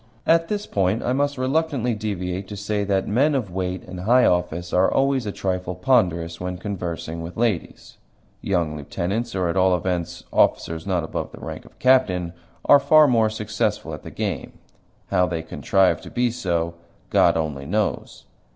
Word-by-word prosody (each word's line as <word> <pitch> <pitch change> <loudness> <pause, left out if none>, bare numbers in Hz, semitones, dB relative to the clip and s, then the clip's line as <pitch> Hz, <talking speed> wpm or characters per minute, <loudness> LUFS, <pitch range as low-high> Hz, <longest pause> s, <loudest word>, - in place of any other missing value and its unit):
At 165 0 +4
this 210 +1 -2
point 100 +3 0
I 125 - 0
must 145 +1 0
reluctantly 130 -2 0
deviate 95 -3 -3
to 105 - -7
say 105 0 -1
that 95 -1 0
men 140 +8 +2
of 115 -9 -2
weight 90 0 -3
and 90 0 -8
high 120 +7 +4
office 90 0 0
are 90 +1 +4
always 135 -4 +1
a - - -1
trifle 90 -2 -3
ponderous 90 -7 +1
when 90 0 -3
conversing 85 -4 -5
with 85 +2 -8
ladies. 110 -7 -2 0.4
Young 85 -5 0
lieutenants 100 +10 -3
or, 90 -2 0
at 85 - -1
all 95 -1 +4
events, 90 -1 -3
officers 80 +2 +1
not 90 -4 0
above 80 - -4
the - - -12
rank - - -7
of - - -19
captain 95 -10 +3 0.3
are 145 - +7
far 150 +2 +6
more 115 -4 +3
successful 110 -1 -2
at - - -7
the - - -9
game. - - -4 0.6
How 90 -2 +3
they 80 -2 -3
contrive 95 +3 +1
to - - -10
be 120 -1 0
so 85 -7 -1 0.4
God - - +4
only 75 -4 -3
knows. 105 +4 -2
95 Hz, 175 wpm, -23 LUFS, 90-120 Hz, 0.6 s, are